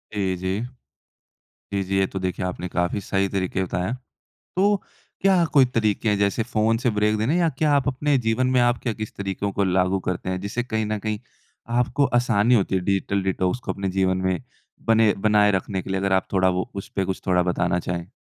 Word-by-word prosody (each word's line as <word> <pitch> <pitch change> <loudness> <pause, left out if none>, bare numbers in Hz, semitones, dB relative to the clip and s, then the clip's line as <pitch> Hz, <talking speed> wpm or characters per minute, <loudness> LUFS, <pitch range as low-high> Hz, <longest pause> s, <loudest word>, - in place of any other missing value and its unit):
जी, 95 -2 0
जी। 95 +4 -2 1.1
जी, 100 -1 0
जी। 95 +1 -1
ये 95 - +3
तो 95 - -5
देखिए 90 0 -2
आपने 90 0 -4
काफ़ी 90 +3 -1
सही 95 0 0
तरीके 95 -1 -1
बताएँ 90 0 -2
हैं। 125 - -2 0.6
तो 205 +2 +4 0.5
क्या 190 -3 +4
कोई 135 -3 +7
तरीके 110 -3 0
हैं 105 - +2
जैसे 100 +3 +1
फ़ोन 110 0 +1
से 120 +1 +1
ब्रेक 105 0 +1
देने 130 +11 +1
या 170 -2 +3
क्या 155 -2 +2
आप 140 0 +2
अपने 140 +1 +1
जीवन 120 +2 +1
में 130 -1 +3
आप 120 0 +3
क्या, 115 -3 -1
किस 110 0 -7
तरीकों 100 0 -3
को 100 - 0
लागू 95 +1 +2
करते 90 +1 -3
हैं? 95 - -2
जिससे 110 +4 -2
कहीं 110 -3 -2
न 105 0 -1
कहीं 105 0 -3 0.6
आपको 125 +3 +2
आसानी 120 0 +3
होती 100 -3 +1
है 95 - +1
डिजिटल 100 +1 0
डिटॉक्स 95 +3 0
को - - -4
अपने 100 -1 -3
जीवन 95 -1 +2
में 95 -2 0 0.5
बने 115 -2 +5
बनाए 105 -1 +5
रखने 95 0 -1
के - - -10
लिए 95 0 0
अगर 100 0 0
आप 95 - +1
थोड़ा 95 -1 +4
वो 90 +5 -2
उसपे 95 0 -3
कुछ 95 0 -3
थोड़ा 90 -1 +3
बताना 90 0 0
चाहें? 85 +1 -4
100 Hz, 215 wpm, -23 LUFS, 95-115 Hz, 1.1 s, कोई